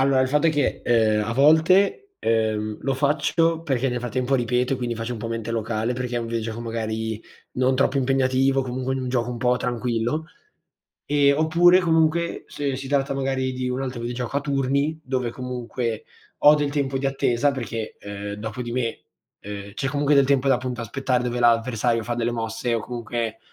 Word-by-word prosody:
Allora, 135 Hz, 0 st, +3 dB
il 130 Hz, -, +2 dB
fatto 150 Hz, +4 st, +2 dB
è -, -, +5 dB
che, 145 Hz, -3 st, 0 dB
ehm, 110 Hz, -3 st, +3 dB
a 115 Hz, -, -2 dB
volte, 175 Hz, -, +4 dB
ehm, 110 Hz, -1 st, 0 dB
lo 135 Hz, -, 0 dB
faccio 160 Hz, +4 st, +1 dB
perché, 135 Hz, -4 st, 0 dB
nel 125 Hz, 0 st, -2 dB
frattempo, 125 Hz, +2 st, -1 dB
ripeto 125 Hz, +1 st, 0 dB
e, -, -, -4 dB
quindi, 120 Hz, -2 st, -3 dB
faccio 115 Hz, +2 st, -4 dB
un -, -, -7 dB
po' 110 Hz, -, -5 dB
mente 115 Hz, 0 st, -4 dB
locale, 115 Hz, +1 st, -1 dB
perché 125 Hz, 0 st, -3 dB
è -, -, +2 dB
un 115 Hz, -, -4 dB
videogioco, 115 Hz, 0 st, -3 dB
magari, 110 Hz, -1 st, -3 dB, 0.3 s
non 130 Hz, +1 st, +2 dB
troppo 135 Hz, +1 st, +2 dB
impegnativo, 135 Hz, 0 st, +2 dB
comunque, 130 Hz, +1 st, -3 dB
un 130 Hz, -1 st, -3 dB
gioco 125 Hz, -1 st, 0 dB
un 120 Hz, -, -5 dB
po' 125 Hz, +1 st, +2 dB
tranquillo. 120 Hz, +4 st, -2 dB, 0.8 s
Ehm, 140 Hz, -1 st, +3 dB
oppure, 175 Hz, +3 st, +5 dB
comunque, 165 Hz, -1 st, +1 dB
se 140 Hz, -2 st, -3 dB
si 135 Hz, +1 st, -6 dB
tratta, 140 Hz, 0 st, 0 dB
magari, 135 Hz, -1 st, -1 dB
di 130 Hz, 0 st, -3 dB
un 125 Hz, +1 st, -2 dB
altro 130 Hz, -2 st, -4 dB
videogioco 120 Hz, +2 st, -3 dB
a -, -, 0 dB
turni 140 Hz, +2 st, 0 dB
dove, 130 Hz, -3 st, -2 dB
comunque, 125 Hz, -2 st, -4 dB, 0.4 s
ho 150 Hz, -, +8 dB
del 145 Hz, -1 st, +1 dB
tempo 140 Hz, -2 st, -1 dB
di 135 Hz, -, 0 dB
attesa, 135 Hz, 0 st, +1 dB
perché, 115 Hz, -4 st, -5 dB
ehm, 100 Hz, 0 st, -6 dB
dopo 110 Hz, +3 st, -5 dB
di 120 Hz, -1 st, -5 dB
me, 120 Hz, -2 st, -2 dB, 0.4 s
ehm, 100 Hz, 0 st, -8 dB
c'è, 135 Hz, -, -2 dB
comunque, 145 Hz, +1 st, +1 dB
del 140 Hz, -1 st, +5 dB
tempo 140 Hz, -1 st, +2 dB
da, 135 Hz, -, +5 dB
appunto, 125 Hz, -1 st, -4 dB
aspettare, 125 Hz, +1 st, -1 dB
dove 125 Hz, 0 st, -2 dB
l'avversario 115 Hz, 0 st, +2 dB
fa 120 Hz, -, -2 dB
delle 120 Hz, 0 st, -1 dB
mosse 115 Hz, +1 st, -2 dB
o, -, -, 0 dB
comunque, 115 Hz, -1 st, -4 dB
125 Hz, 195 wpm, -23 LUFS, 115-140 Hz, 0.8 s, ho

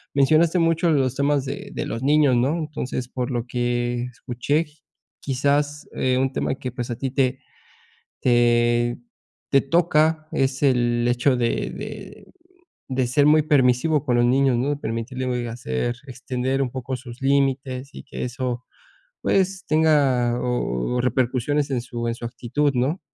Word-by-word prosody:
mencionaste 155 Hz, +5 st, +4 dB
mucho 165 Hz, 0 st, +2 dB
los 135 Hz, -5 st, +1 dB
temas 140 Hz, 0 st, +1 dB
de 135 Hz, -, -6 dB
de -, -, -3 dB
los 115 Hz, -, -4 dB
niños, 145 Hz, -1 st, +4 dB
¿no? 130 Hz, +7 st, +1 dB
Entonces, 150 Hz, -6 st, -4 dB
por 125 Hz, -1 st, -4 dB
lo 120 Hz, -3 st, -2 dB
que 120 Hz, 0 st, -1 dB
escuché, 125 Hz, +6 st, -1 dB, 0.5 s
quizás, 145 Hz, +2 st, 0 dB
eh, 130 Hz, -1 st, +1 dB
un 135 Hz, +1 st, 0 dB
tema -, -, -1 dB
que 130 Hz, -1 st, -6 dB
pues 120 Hz, 0 st, -5 dB
a 120 Hz, -, -3 dB
ti, 135 Hz, +1 st, -3 dB
te 130 Hz, -1 st, +1 dB, 0.8 s
te 120 Hz, -1 st, +3 dB, 0.5 s
te 135 Hz, -, +5 dB
toca 155 Hz, 0 st, +2 dB
es 135 Hz, +1 st, 0 dB
el 120 Hz, -3 st, +2 dB
hecho 125 Hz, +2 st, +2 dB
de 120 Hz, -1 st, -1 dB
de -, -, -9 dB, 0.6 s
de 130 Hz, -1 st, +1 dB
ser 140 Hz, +4 st, +3 dB
muy 155 Hz, +1 st, +5 dB
permisivo 145 Hz, 0 st, +3 dB
con 125 Hz, -4 st, +1 dB
los 120 Hz, -, +3 dB
niños, 130 Hz, +1 st, +3 dB
¿no? 130 Hz, +4 st, 0 dB
De 145 Hz, -, 0 dB
permitirle 125 Hz, +1 st, -3 dB
hacer 115 Hz, -, -2 dB
extender 130 Hz, +1 st, -2 dB
un 130 Hz, -, -1 dB
poco 130 Hz, +1 st, -4 dB
sus 120 Hz, -1 st, -11 dB
límites 135 Hz, -1 st, 0 dB
y -, -, -9 dB
que -, -, -5 dB
eso 125 Hz, 0 st, -3 dB, 0.6 s
pues, 190 Hz, -1 st, +1 dB
tenga, 140 Hz, -6 st, +3 dB
o 125 Hz, -, -1 dB
repercusiones 130 Hz, +3 st, 0 dB
en 130 Hz, -3 st, 0 dB
su 120 Hz, -1 st, -5 dB
en 115 Hz, -, -1 dB
su 120 Hz, -, -9 dB
actitud, 125 Hz, +5 st, -1 dB
¿no? 130 Hz, +9 st, 0 dB
130 Hz, 155 wpm, -23 LUFS, 120-145 Hz, 0.8 s, te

